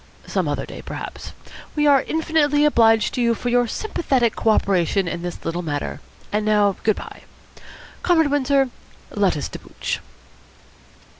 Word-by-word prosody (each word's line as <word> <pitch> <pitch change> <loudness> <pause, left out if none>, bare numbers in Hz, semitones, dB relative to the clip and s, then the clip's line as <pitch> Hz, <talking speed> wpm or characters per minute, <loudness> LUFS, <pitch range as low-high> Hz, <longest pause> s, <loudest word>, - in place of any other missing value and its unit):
Some - - -1
other - - -2
day, - - -9
perhaps. - - -7 0.4
We 295 -1 +2
are 280 -2 +6
infinitely 300 -1 +1
obliged 225 -6 +4
to 250 - -1
you 235 -1 +3
for 245 - -3
your 245 0 +3
sympathetic 260 - 0
co 225 - +1
operation 195 -2 +2
in 170 0 -3
this 175 0 -6
little 165 +1 -2
matter. 145 -4 -4 0.3
And 210 +1 0
now 210 -2 +3
good 215 -2 +2
bye. - - -9 0.8
Comrade 320 -5 +3
Windsor, 275 -2 +2 0.4
let 200 -6 +1
us 145 - -3
debouch." - - -5
235 Hz, 150 wpm, -22 LUFS, 200-290 Hz, 0.8 s, are